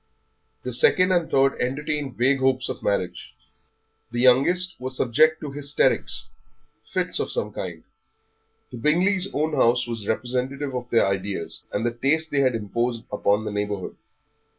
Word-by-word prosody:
The -, -, -3 dB
second 185 Hz, -, +4 dB
and 175 Hz, -3 st, +1 dB
third 135 Hz, 0 st, +2 dB
entertained 145 Hz, +1 st, -2 dB
vague 135 Hz, +3 st, +2 dB
hopes 130 Hz, -1 st, +1 dB
of -, -, -5 dB
marriage. 95 Hz, -3 st, -3 dB, 0.7 s
The 120 Hz, +1 st, -4 dB
youngest 175 Hz, +9 st, +4 dB
was 130 Hz, 0 st, -4 dB
subject 155 Hz, +6 st, +3 dB
to 150 Hz, -, -5 dB
hysterics, 145 Hz, +1 st, 0 dB, 0.5 s
fits -, -, -1 dB
of -, -, -2 dB
some -, -, +3 dB
kind. -, -, -6 dB, 0.9 s
The 125 Hz, -, -7 dB
Bingleys' 180 Hz, -, +2 dB
own 155 Hz, +2 st, -1 dB
house 120 Hz, -3 st, +3 dB
was 115 Hz, -3 st, -4 dB
representative 130 Hz, +4 st, -2 dB
of 125 Hz, -1 st, -5 dB
their 115 Hz, -, +3 dB
ideas, 95 Hz, -2 st, -3 dB
and 105 Hz, +3 st, -2 dB
the 120 Hz, -, +1 dB
taste 150 Hz, +6 st, 0 dB
they 140 Hz, -, +1 dB
had 130 Hz, -3 st, +2 dB
imposed 115 Hz, +2 st, -2 dB
upon 105 Hz, +1 st, +1 dB
the 105 Hz, -, -3 dB
neighbourhood. 105 Hz, -2 st, -3 dB
130 Hz, 150 wpm, -24 LUFS, 115-150 Hz, 0.9 s, second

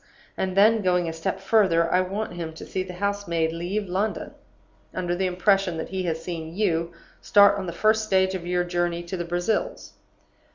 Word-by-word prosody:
And 190 Hz, 0 st, -2 dB
then, 220 Hz, +2 st, +5 dB
going 180 Hz, -2 st, +1 dB
a 165 Hz, -, -3 dB
step 165 Hz, 0 st, -3 dB
further, 170 Hz, -7 st, +3 dB
I 180 Hz, -, +4 dB
want 195 Hz, +2 st, -3 dB
him 165 Hz, -2 st, -5 dB
to -, -, -9 dB
see 190 Hz, -, -3 dB
the 185 Hz, -1 st, -7 dB
house 200 Hz, +1 st, -2 dB
maid 165 Hz, -1 st, 0 dB
leave 185 Hz, +5 st, -3 dB
London, 195 Hz, +4 st, -2 dB, 0.6 s
under 175 Hz, -1 st, -1 dB
the 190 Hz, +1 st, 0 dB
impression 185 Hz, -1 st, +1 dB
that 160 Hz, -, -5 dB
he 190 Hz, 0 st, -3 dB
has 160 Hz, -1 st, -2 dB
seen 165 Hz, -2 st, -6 dB
you 170 Hz, -5 st, 0 dB, 0.3 s
start 200 Hz, 0 st, +5 dB
on 190 Hz, -, -5 dB
the -, -, -3 dB
first 220 Hz, +4 st, +2 dB
stage 190 Hz, -2 st, +2 dB
of 175 Hz, -2 st, -5 dB
your 180 Hz, 0 st, +1 dB
journey 175 Hz, -1 st, -1 dB
to 175 Hz, +2 st, -5 dB
the 175 Hz, -1 st, -3 dB
Brazils. 175 Hz, -, -2 dB
180 Hz, 200 wpm, -25 LUFS, 170-200 Hz, 0.6 s, then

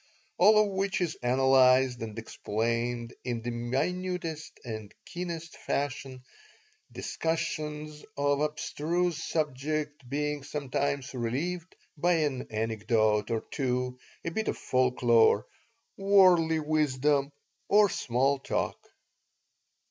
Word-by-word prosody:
All 210 Hz, +4 st, +7 dB
of -, -, -3 dB
which 195 Hz, 0 st, -1 dB
is 175 Hz, -4 st, 0 dB
analyzed 130 Hz, 0 st, +4 dB
and 110 Hz, -1 st, -6 dB
explained 115 Hz, +2 st, -2 dB
in 120 Hz, -3 st, -3 dB
the 120 Hz, -, -2 dB
minutest 160 Hz, +7 st, -3 dB
and 110 Hz, -3 st, -6 dB
keenest 170 Hz, -2 st, -6 dB
fashion, 140 Hz, -2 st, -3 dB, 0.7 s
discussions 155 Hz, -2 st, -3 dB
on 145 Hz, 0 st, +2 dB
abstruse 160 Hz, +3 st, -1 dB
subjects 150 Hz, 0 st, -2 dB
being 150 Hz, +1 st, -1 dB
sometimes 140 Hz, -1 st, -2 dB
relieved 155 Hz, +9 st, -3 dB, 0.2 s
by 175 Hz, +4 st, +3 dB
an 145 Hz, -6 st, 0 dB
anecdote 110 Hz, -1 st, +1 dB
or 115 Hz, -1 st, 0 dB
two, 125 Hz, -1 st, -1 dB, 0.3 s
a 170 Hz, -, -1 dB
bit 220 Hz, +6 st, -2 dB
of -, -, -1 dB
folklore, 125 Hz, -3 st, +3 dB, 0.5 s
worldly 185 Hz, -5 st, +5 dB
wisdom, 150 Hz, -2 st, +1 dB, 0.4 s
or 210 Hz, 0 st, +6 dB
small 135 Hz, -3 st, +1 dB
talk. -, -, -2 dB
140 Hz, 100 wpm, -29 LUFS, 125-160 Hz, 0.7 s, All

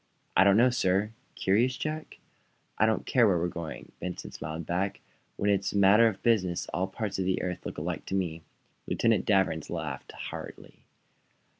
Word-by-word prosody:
"I -, -, +7 dB
don't 100 Hz, +1 st, +5 dB
know, 125 Hz, +2 st, +5 dB
sir." 100 Hz, -3 st, +1 dB, 0.2 s
"Curious, 120 Hz, +7 st, +2 dB
Jack?" 155 Hz, 0 st, -4 dB, 0.6 s
"I 110 Hz, -, +5 dB
don't 110 Hz, -, 0 dB
care 120 Hz, -4 st, +4 dB
where 95 Hz, -3 st, +3 dB
we're 85 Hz, +1 st, 0 dB
going," 85 Hz, -2 st, -7 dB
Benson 90 Hz, -1 st, -5 dB
smiled 80 Hz, +1 st, -6 dB
back. 95 Hz, +4 st, -1 dB, 0.4 s
"When 100 Hz, -, +2 dB
it's 100 Hz, -1 st, 0 dB
a -, -, 0 dB
matter 100 Hz, +4 st, +6 dB
of 105 Hz, -4 st, -3 dB
business 95 Hz, -7 st, +2 dB
all 95 Hz, +2 st, 0 dB
parts 100 Hz, 0 st, -4 dB
of 95 Hz, -, 0 dB
the 95 Hz, 0 st, +1 dB
earth 90 Hz, -1 st, -4 dB
look -, -, -7 dB
alike -, -, -4 dB
to 95 Hz, -, -2 dB
me." 85 Hz, -4 st, -2 dB, 0.5 s
Lieutenant 115 Hz, -3 st, +2 dB
Danvers 95 Hz, -6 st, +2 dB
laughed -, -, -5 dB
heartily. -, -, -9 dB
95 Hz, 175 wpm, -29 LUFS, 90-110 Hz, 0.6 s, I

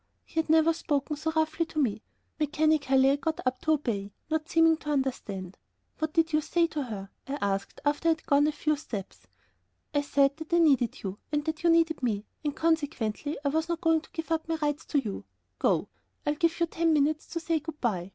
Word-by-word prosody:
He 325 Hz, -, -3 dB
had 320 Hz, -, -1 dB
never 320 Hz, +1 st, +5 dB
spoken 295 Hz, -2 st, -1 dB
so 320 Hz, +2 st, -2 dB
roughly 315 Hz, +1 st, +1 dB
to 310 Hz, -, -4 dB
me. 220 Hz, -7 st, +1 dB, 0.4 s
Mechanically 295 Hz, -3 st, +3 dB
I 280 Hz, -, +2 dB
got 320 Hz, +2 st, -2 dB
up 255 Hz, 0 st, 0 dB
to 315 Hz, -, +3 dB
obey, 215 Hz, -9 st, -2 dB, 0.2 s
not 315 Hz, 0 st, -1 dB
seeming 325 Hz, -1 st, +5 dB
to 300 Hz, -, -8 dB
understand. 215 Hz, -10 st, -2 dB, 0.4 s
"What 315 Hz, -1 st, -1 dB
did 330 Hz, 0 st, +2 dB
you 305 Hz, -, +4 dB
say 335 Hz, +2 st, +2 dB
to 305 Hz, -2 st, -3 dB
her?" 205 Hz, -6 st, -6 dB, 0.2 s
I 280 Hz, +1 st, -3 dB
asked, 200 Hz, -1 st, -2 dB
after 290 Hz, +3 st, +1 dB
I -, -, +6 dB
had -, -, -22 dB
gone 285 Hz, +1 st, +4 dB
a -, -, +2 dB
few 305 Hz, +1 st, 0 dB
steps. 205 Hz, -, -7 dB, 0.7 s
"I 290 Hz, -, +3 dB
said 280 Hz, 0 st, +2 dB
that 320 Hz, +1 st, -7 dB
I -, -, +6 dB
needed 275 Hz, -8 st, +3 dB
you 195 Hz, 0 st, -4 dB
and 295 Hz, 0 st, 0 dB
that 315 Hz, 0 st, -3 dB
you 345 Hz, -, +3 dB
needed 330 Hz, -2 st, +3 dB
me, 215 Hz, -4 st, -1 dB, 0.2 s
and 295 Hz, -2 st, -2 dB
consequently 295 Hz, -5 st, 0 dB
I -, -, +3 dB
was 320 Hz, +3 st, 0 dB
not 340 Hz, -1 st, -2 dB
going 325 Hz, -2 st, +3 dB
to -, -, -18 dB
give 325 Hz, 0 st, -6 dB
up 320 Hz, -1 st, 0 dB
my 325 Hz, -, +1 dB
rights 295 Hz, -1 st, -2 dB
to 295 Hz, -, -1 dB
you. 215 Hz, -7 st, -4 dB, 0.4 s
Go; -, -, +2 dB, 0.4 s
I 295 Hz, -, +2 dB
give 335 Hz, +3 st, +1 dB
you 340 Hz, -, +4 dB
ten 330 Hz, 0 st, +1 dB
minutes 300 Hz, +1 st, +1 dB
to 335 Hz, -, -4 dB
say 330 Hz, -1 st, 0 dB
good 310 Hz, 0 st, -8 dB
by." 190 Hz, -7 st, -1 dB
300 Hz, 220 wpm, -28 LUFS, 270-320 Hz, 0.7 s, I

